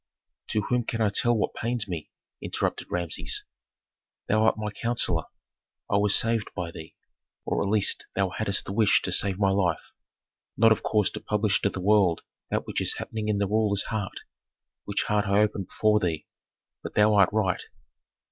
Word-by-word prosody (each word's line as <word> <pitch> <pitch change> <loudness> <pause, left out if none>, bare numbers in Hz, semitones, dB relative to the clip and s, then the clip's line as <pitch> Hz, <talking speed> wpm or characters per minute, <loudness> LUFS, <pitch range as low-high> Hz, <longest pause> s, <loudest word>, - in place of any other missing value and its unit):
"To 105 - 0
whom 125 +4 0
can 115 - -3
I 110 -2 +3
tell 120 +3 +2
what 105 - -1
pains 115 -1 -2
me?" 85 -5 -5 0.3
interrupted - - -2
Rameses. 85 -3 -2 0.8
"Thou 110 +1 +2
art 110 - +3
my 105 -1 -3
counsellor; 100 -7 0 0.7
I 100 - +4
was 100 0 +4
saved 115 -2 +1
by 85 -2 -4
thee, 80 -1 -10 0.5
or - - -1
at 100 - -1
least 105 -1 +3
thou 95 -1 +1
hadst 100 +1 -2
the 95 - -5
wish 110 -1 +3
to - - -2
save 95 -2 +1
my 100 -1 +2
life, 90 -4 0 0.7
not 115 +2 +5
of 110 - +3
course 105 -3 +1
to - - -6
publish 105 -1 0
to 100 - +2
the 95 - -6
world 95 -3 +3 0.3
that - - -1
which - - -2
is - - 0
happening 110 -1 -4
in 105 -1 +1
the 100 - +1
ruler's 105 -1 +1
heart, 105 -3 -4 0.6
which 100 0 -1
heart 105 0 0
I 100 +1 +3
open 105 -2 0
before 105 +2 +2
thee. 85 -6 -2 0.6
But - - -8
thou 105 +1 +5
art 100 -3 +5
right." 105 -4 0
105 Hz, 185 wpm, -26 LUFS, 95-110 Hz, 0.8 s, not